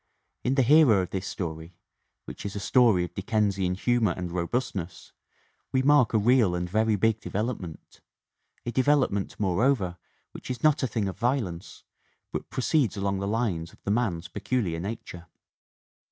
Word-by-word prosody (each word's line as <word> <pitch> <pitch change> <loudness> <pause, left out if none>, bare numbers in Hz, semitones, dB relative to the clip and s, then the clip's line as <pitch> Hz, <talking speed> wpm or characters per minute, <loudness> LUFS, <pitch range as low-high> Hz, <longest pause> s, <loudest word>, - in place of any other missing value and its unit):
In 130 - +1
the 135 - +4
hero 125 -7 +5
of 90 - -7
this 95 0 -3
story, 80 -3 -6 0.5
which - - -9
is 100 0 -5
a - - -2
story 110 -4 +4
of 90 - -6
Dickensian 100 -2 0
humor 115 -2 +1
and 90 -2 -4
robustness, 90 0 -3 0.6
we 130 0 +1
mark 140 -5 +4
a - - +6
real 110 -4 +3
and 90 0 -2
very 110 +3 +2
big 110 +2 +1
development 105 -7 -5 0.6
a 120 - -2
develop 135 +3 +3
ment, 100 -1 -4
moreover, 100 -1 +1 0.3
which - - -10
is 125 -2 -4
not 155 0 +4
a 130 - +1
thing 110 -3 -2
of 95 - -6
violence 120 -9 -2 0.5
but - - -5
proceeds 130 - +1
along 100 -1 -1
the 100 - -2
lines 100 -7 -1
of - - -22
the 100 - -1
man's 100 -7 -1
peculiar 90 -2 -2
nature. 90 -3 -7
105 Hz, 165 wpm, -27 LUFS, 90-120 Hz, 0.6 s, a